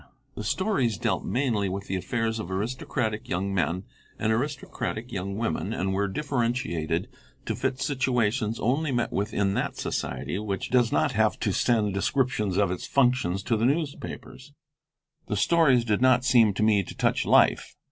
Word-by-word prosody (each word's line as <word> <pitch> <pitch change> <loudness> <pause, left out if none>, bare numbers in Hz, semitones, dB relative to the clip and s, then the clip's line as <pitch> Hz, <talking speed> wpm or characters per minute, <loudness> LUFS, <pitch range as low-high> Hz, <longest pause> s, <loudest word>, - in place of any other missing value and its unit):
The - - -6
stories 135 - 0
dealt - - -1
mainly 110 -4 0
with 100 +1 -4
the 95 - -3
affairs 115 +4 -1
of 100 - -5
aristocratic 110 +1 -2
young 95 +3 -1
men 90 0 0 0.3
and 110 - 0
aristocratic 125 -2 -3
young 100 +1 -4
women, 110 -1 -2
and 95 -1 -1
were 100 +1 +1
differentiated 115 - -1 0.4
to 110 - -2
fit 130 +3 -2
situations 125 -5 0
only 140 +6 0
met 120 -2 -1
with 100 +2 -1
in 100 -2 +1
that - - -2
society 95 - -3
which 100 -3 -4
does 125 -2 +3
not - - +2
have - - +1
to - - +1
send 110 -4 +1
descriptions 105 -2 0
of 100 -3 +2
its 90 - -4
functions 125 -8 +2
to 115 - +1
the 110 - -1
newspapers. 145 +2 -3 0.7
The 105 - -1
stories 135 -3 +4
did 110 0 +1
not 130 -1 +4
seem 115 -6 +5
to 105 - 0
me 105 -2 +4
to 95 - -10
touch - - +1
life. - - +3
110 Hz, 165 wpm, -26 LUFS, 100-125 Hz, 0.7 s, seem